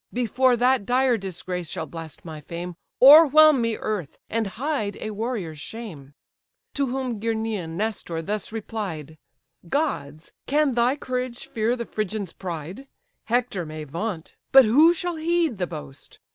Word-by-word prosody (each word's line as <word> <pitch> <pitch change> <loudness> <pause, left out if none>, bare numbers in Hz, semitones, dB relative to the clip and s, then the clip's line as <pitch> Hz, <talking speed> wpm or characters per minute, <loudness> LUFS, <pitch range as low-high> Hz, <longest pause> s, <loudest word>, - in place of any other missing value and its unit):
Before 250 +1 +2
that 250 -1 +3
dire 250 +3 +2
disgrace 180 -4 -5
shall 160 - -4
blast 160 0 -10
my 155 -2 -8
fame, 170 +3 -6 0.3
O'erwhelm 305 0 +8
me, 230 -1 0
earth; 200 -9 -4
and 225 -2 0
hide 220 -1 -3
a 215 - -4
warrior's 210 -8 -4
shame!" 155 -5 -9 0.6
To 280 -1 0
whom 255 -3 -3
Gerenian 220 -7 -2
Nestor 195 -6 -3
thus 210 +4 -3
replied: 190 -9 -5 0.5
"Gods! 155 - -2 0.2
can 295 -1 +2
thy 240 +3 +2
courage 250 -3 -4
fear 235 -3 0
the 235 -1 -5
Phrygian's 215 -4 -4
pride? 180 - -7 0.4
Hector 235 -5 0
may 155 -1 -7
vaunt, 165 +3 -5 0.2
but 270 -2 +9
who 295 +10 +6
shall 350 0 -3
heed 330 - 0
the 180 - 0
boast? 150 -4 -10
220 Hz, 145 wpm, -24 LUFS, 170-255 Hz, 0.6 s, but